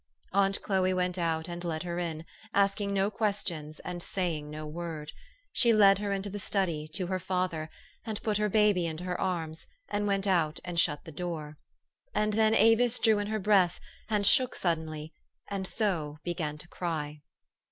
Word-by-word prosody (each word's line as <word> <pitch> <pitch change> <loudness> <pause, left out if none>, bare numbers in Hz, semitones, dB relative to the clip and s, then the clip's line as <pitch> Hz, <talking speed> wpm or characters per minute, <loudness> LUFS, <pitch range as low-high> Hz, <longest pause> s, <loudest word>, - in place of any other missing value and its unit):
Aunt 195 0 +3
Chloe 185 -2 +2
went 180 0 0
out 160 -1 0
and 175 0 -6
led 165 -1 -2
her 175 -1 -3
in, 165 -2 -3 0.3
asking 200 0 +2
no 200 +1 +1
questions, 190 -8 -2
and 175 -1 -5
saying 165 -6 -2
no 155 +1 -6
word. 155 -1 -5 0.4
She 235 -2 +4
led 200 -2 +6
her 205 -1 -2
into 195 0 -2
the 205 +1 -5
study, 175 -6 -1
to 185 - 0
her 185 +1 -1
father, 180 -3 -1 0.3
and 220 -1 -4
put 215 -2 +1
her 210 0 +1
baby 205 -4 +3
into 160 +2 -5
her 180 -1 -3
arms, 165 -4 -2 0.2
and 205 0 -1
went 195 0 +1
out 170 -5 +2
and 175 -2 -1
shut 150 -3 +1
the 160 - -8
door. 155 -2 -5 0.6
And 215 0 +2
then 220 +1 +4
Avis 225 +3 +5
drew 220 -3 +4
in 205 - -2
her 215 +1 -1
breath, 190 -3 +3 0.3
and 210 -2 +1
shook 250 +5 +4
suddenly, 160 -2 -2 0.4
and 195 -2 -1
so 170 -10 0
began 165 -4 -2
to 175 - -10
cry. 155 -4 -4
180 Hz, 180 wpm, -30 LUFS, 160-200 Hz, 0.6 s, led